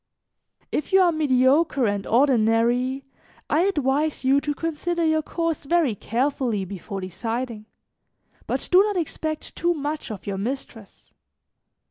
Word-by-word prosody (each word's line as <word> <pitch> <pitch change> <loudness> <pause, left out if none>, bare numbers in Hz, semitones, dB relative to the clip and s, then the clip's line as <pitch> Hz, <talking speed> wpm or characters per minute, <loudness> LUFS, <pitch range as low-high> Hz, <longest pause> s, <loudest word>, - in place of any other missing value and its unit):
"If 300 - -2
you 385 - +6
are 355 -2 +5
mediocre 280 -1 +3
and 205 -2 -1
ordinary, 245 +1 +2 0.5
I 325 +4 +3
advise 295 -5 0
you 275 +2 +4
to 295 0 -2
consider 330 +2 -2
your 315 0 +2
course 330 -1 -3
very 320 -5 +2
carefully 235 -1 -1
before 195 +1 -6
deciding, 225 +4 -4 0.8
but - - -2
do 365 +1 +8
not 410 -1 0
expect 315 -2 -4
too 345 +1 +1
much 295 +1 -4
of 215 -4 -7
your 195 -1 -3
mistress. 225 -2 -6
275 Hz, 130 wpm, -24 LUFS, 230-315 Hz, 0.8 s, do